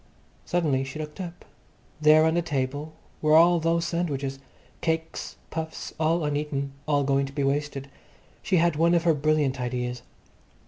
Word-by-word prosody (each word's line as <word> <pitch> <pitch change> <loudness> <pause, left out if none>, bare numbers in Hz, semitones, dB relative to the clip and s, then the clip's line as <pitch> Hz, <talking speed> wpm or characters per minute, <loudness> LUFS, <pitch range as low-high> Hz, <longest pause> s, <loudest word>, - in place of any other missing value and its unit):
Suddenly 155 -7 +1
she 135 +2 -7
looked 155 +4 -6
up. 175 -1 -8 0.6
There 155 +1 +6
on 160 - +3
the 175 - +2
table 145 0 -3 0.3
were 155 0 +4
all 170 +1 +6
those 165 +1 +1
sandwiches, 140 -6 -2 0.4
cakes, 160 0 -2 0.2
puffs, 160 0 -5
all 160 +1 +2
uneaten, 145 -1 -2 0.2
all 145 -2 +2
going 135 0 +1
to 135 - -11
be 140 0 -1
wasted. 140 0 -1 0.5
She 185 - +1
had 170 -1 +3
one 170 +3 +3
of 170 - +2
her 170 -2 +4
brilliant 145 -3 +1
ideas. 125 0 -3
150 Hz, 155 wpm, -26 LUFS, 140-165 Hz, 0.6 s, There